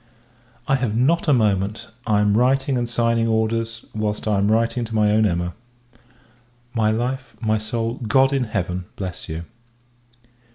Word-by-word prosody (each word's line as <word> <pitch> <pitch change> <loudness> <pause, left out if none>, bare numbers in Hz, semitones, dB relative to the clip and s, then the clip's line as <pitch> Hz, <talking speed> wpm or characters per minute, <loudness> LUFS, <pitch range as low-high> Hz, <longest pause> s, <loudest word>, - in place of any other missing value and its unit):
I 135 -2 +3
have 115 -4 -1
not 165 +8 +2
a - - +5
moment; 105 -4 +1 0.2
I 105 -2 +3
am 105 0 +3
writing 130 +3 +2
and 120 -1 -1
signing 115 -1 +1
orders, 115 +1 -1
whilst 105 0 -2
I 105 -2 +2
am 100 +2 +2
writing 115 +2 +1
to 110 0 -6
my 105 -1 +3
own 110 0 +4
Emma. 85 -1 -1 1.2
My 110 -2 +2
life, 125 +3 -2
my 110 -2 +1
soul, 115 +2 -3
God 135 +4 +4
in 135 -2 +1
Heaven 90 -4 -3
bless 95 -3 -6
you! 80 +1 -4
110 Hz, 160 wpm, -22 LUFS, 105-120 Hz, 1.2 s, a